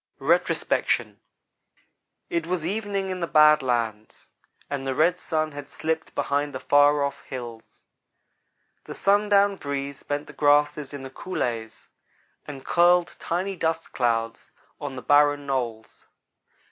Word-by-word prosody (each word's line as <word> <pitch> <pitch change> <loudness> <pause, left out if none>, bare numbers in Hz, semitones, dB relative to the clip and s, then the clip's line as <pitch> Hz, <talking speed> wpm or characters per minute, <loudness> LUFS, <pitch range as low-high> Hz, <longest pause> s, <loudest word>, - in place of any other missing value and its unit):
RETROSPECTION - - 0 1.1
IT 170 -1 -1
was 175 -3 -2
evening 200 0 -2
in 185 - -4
the 170 - -2
bad 150 -1 +6
lands, 115 -4 -3 0.4
and 135 -1 -4
the 135 - -1
red 170 +4 +2
sun 155 -1 -1
had 145 -1 -9
slipped 160 0 -3
behind 145 0 -1
the - - -3
far 145 +1 +4
off 140 - -3
hills. 120 -3 -9 1.0
The - - -8
sundown 200 0 +3
breeze 140 -2 -5
bent 145 0 -3
the - - -13
grasses 145 -1 +2
in 140 -2 -7
the 135 - -8
coulées 115 -9 -4 0.6
and 135 -2 -9
curled 175 0 +3
tiny 185 +3 -2
dust 165 -1 -2
clouds 115 -2 -1 0.3
on 145 -3 -5
the 125 - -7
barren 145 0 +4
knolls. 120 -5 -4
145 Hz, 135 wpm, -25 LUFS, 135-170 Hz, 1.1 s, bad